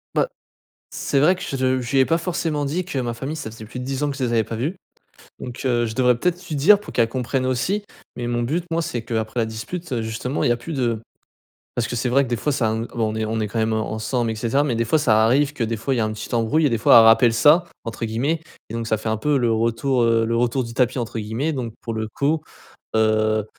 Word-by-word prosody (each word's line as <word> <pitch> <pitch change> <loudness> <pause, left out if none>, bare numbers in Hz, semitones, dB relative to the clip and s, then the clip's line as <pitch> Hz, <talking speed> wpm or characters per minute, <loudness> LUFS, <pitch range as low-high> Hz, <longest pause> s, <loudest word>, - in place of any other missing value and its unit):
Bah, - - +3 0.6
c'est 140 - -1
vrai 165 +7 +5
que 185 - -11
je - - -4
le 130 0 +1
je 120 - -5
lui 135 - +3
ai 130 - +5
pas 165 - +2
forcément 165 -4 -2
dit 170 +6 -2
que 155 - -5
ma 120 -2 -2
famille 135 +6 -5
ça 130 -8 -6
faisait 110 0 -10
plus 125 +4 -8
de 125 - -5
10 135 +1 -3
ans 145 - +1
que 140 - -5
je 130 - -2
les 120 - 0
avais 115 -1 +3
pas 115 - -6
vus. 140 - -2 0.6
Donc, 125 -1 -7
heu, 120 -2 +2
je 110 -1 -5
devrais 125 -1 +3
peut-être 180 +6 -1
lui 155 - -3
dire 190 +9 +6
pour 210 - -11
qu'elle 115 -2 +2
comprenne 130 +1 -1
aussi. 175 - 0 0.3
Mais 120 -1 -4
mon 120 0 -1
but 160 +9 -1
moi 165 +1 +1
c'est 120 -7 -3
qu'après 110 0 -2
la 115 - +2
dispute, 125 +10 -6
heu, 120 -3 0
justement 110 +5 -3
il - - +3
y - - +4
a 120 - +1
plus 160 +7 -7
de 120 -5 0 0.8
parce 120 -2 0
que - - -5
c'est 125 - 0
vrai 135 +3 +3
que - - -7
des 120 - 0
fois 130 +7 -1
ça 120 -5 +1
em 110 +1 -2
bon, 110 -3 -2
on - - -5
est 110 - -1
on 110 +1 -2
est 110 - 0
quand 115 - -4
même, 110 0 +1
heu, - - +1
ensemble 110 +2 -1
et - - -2
cetera, 120 +6 +1
mais 135 -5 0
des 115 - +1
fois 155 - +3
ça 110 -7 +3
arrive 140 +5 +3
que 140 - -4
des 115 +1 -2
fois 130 +5 -1
il - - -1
y - - +2
a - - +2
un 110 - -3
petit 110 - -6
embrouille 120 +7 +2
et - - +2
des 115 - +1
fois - - +6
«elle 115 - +8
rappelle 115 +1 +6
ça» 155 +8 +5 0.2
entre 115 0 -5
guillemets 130 +9 -1 0.3
et - - -6
donc 115 0 -3
ça 110 - +1
fait 110 +1 -5
un 110 - +1
peu 145 +6 +1
le 120 -2 +2
retour, 115 +3 +1
heu, 115 -1 +3
«le 115 +1 0
retour 125 +2 +1
du 115 0 -8
tapis» 125 +1 +1
entre 115 -1 -3
guillemets. 110 +9 -2
Donc 125 -5 -4
pour 115 - -5
le 110 0 -3
coup, 150 +7 0 0.5
heu, 110 -1 +2
120 Hz, 295 wpm, -22 LUFS, 115-140 Hz, 0.8 s, elle